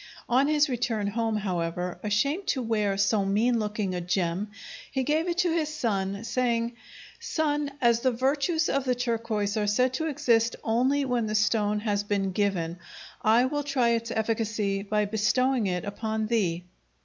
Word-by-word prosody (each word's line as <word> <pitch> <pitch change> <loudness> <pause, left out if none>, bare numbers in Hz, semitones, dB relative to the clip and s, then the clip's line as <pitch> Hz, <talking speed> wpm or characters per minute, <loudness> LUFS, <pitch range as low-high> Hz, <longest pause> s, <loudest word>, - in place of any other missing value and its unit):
On 260 +4 +3
his 300 0 +3
return 240 -5 -1
home, 225 +1 -1
however, 180 -2 -2
ashamed 280 - 0
to 260 - 0
wear 210 -3 0
so 200 +1 +2
mean 225 +5 +2
looking 210 -3 -2
a 180 - -2
gem, 180 +2 -1 0.4
he 265 -1 0
gave 310 +5 +1
it 345 -1 -1
to 355 -2 +2
his 315 -3 0
son, 200 -7 -2
saying, 235 -1 0 0.5
"Son, 295 -2 -1
as 235 -2 +4
the 255 - +2
virtues 280 +6 +1
of 275 0 0
the 255 -1 +1
turquoise 230 -4 -1
are 210 -1 0
said 250 +5 +2
to 320 +5 -1
exist 235 -6 +2
only 260 +5 +2
when 245 -3 0
the 215 - -2
stone 210 0 +2
has 205 -2 0
been 200 -2 -1
given, 180 -4 -1 0.4
I 225 +3 +4
will 290 +2 -1
try 275 -4 +1
its 230 0 0
efficacy 215 -3 -1
by 210 +1 0
bestowing 220 +3 +1
it 180 0 -2
upon 220 +1 -2
thee." 185 -7 0
225 Hz, 170 wpm, -27 LUFS, 205-255 Hz, 0.5 s, as